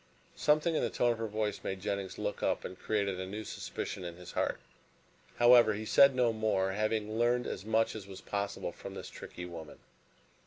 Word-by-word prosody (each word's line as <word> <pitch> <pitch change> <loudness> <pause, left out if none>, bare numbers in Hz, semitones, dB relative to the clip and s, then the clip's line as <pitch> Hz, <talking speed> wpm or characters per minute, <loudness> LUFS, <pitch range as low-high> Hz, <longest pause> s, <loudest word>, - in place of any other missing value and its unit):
Something 155 +2 +3
in - - +1
the - - +1
tone 120 - +2
of 115 - -3
her 115 - -1
voice 105 0 -2
made 95 0 -3
Jennings 100 -1 -3
look - - -3
up - - 0
and 90 - -7
created 100 -3 0
a 95 - -4
new 105 +3 -5
suspicion 95 - -5
in 85 -1 -6
his 90 0 -10
heart. - - -1 0.8
However, 120 -2 +7
he 110 +1 -5
said 140 +4 +6
no 120 -2 +3
more, 105 -3 +1
having 110 +1 -1
learned 120 +1 +2
as - - -4
much 110 +1 +2
as 100 -3 -7
was 95 -1 -9
possible 100 0 -3
from - - -9
this - - -7
tricky 90 - -8
woman. 80 -3 -9
110 Hz, 200 wpm, -32 LUFS, 95-115 Hz, 0.8 s, However